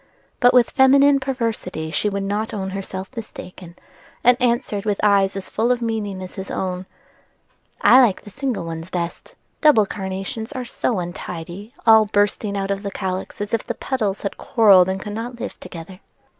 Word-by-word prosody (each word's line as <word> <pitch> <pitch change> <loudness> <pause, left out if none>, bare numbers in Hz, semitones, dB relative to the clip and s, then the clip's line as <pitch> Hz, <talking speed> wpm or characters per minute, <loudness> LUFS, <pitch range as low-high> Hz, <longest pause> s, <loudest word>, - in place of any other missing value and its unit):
But 245 0 +6
with 245 -2 +4
feminine 275 +1 +5
perversity 230 -11 -3
she 210 - +1
would 200 -1 -3
not 210 +3 -2
own 190 -2 -3
herself 190 0 -6
mistaken, 185 -5 -9 0.5
and 245 +1 +6
answered 235 -4 0
with 205 -2 -1
eyes 200 -2 +3
as 195 -1 -6
full 230 +3 0
of 250 - +1
meaning 215 -5 -3
as 185 - -9
his 190 0 -7
own: 185 0 -3 0.9
"I 260 - +7
like 225 -7 +2
the 205 - -12
single 245 -4 -3
ones 165 +1 -6
best: 170 -2 -5 0.3
double 290 -9 +6
carnations 195 +3 -5
are 255 -1 -4
so 235 -1 -1
untidy, 175 - -6
all 220 -1 +7
bursting 205 0 0
out 195 0 -2
of 200 0 -2
the 200 - -4
calyx 190 0 -4
as 205 +1 -4
if 230 - +1
the - - -2
petals 215 -7 -2
had 200 - -4
quarrelled 195 -6 +5
and 190 0 -2
could 205 +1 -6
not 235 +2 -5
live - - -6
together." 180 +1 -10
205 Hz, 180 wpm, -21 LUFS, 190-230 Hz, 0.9 s, I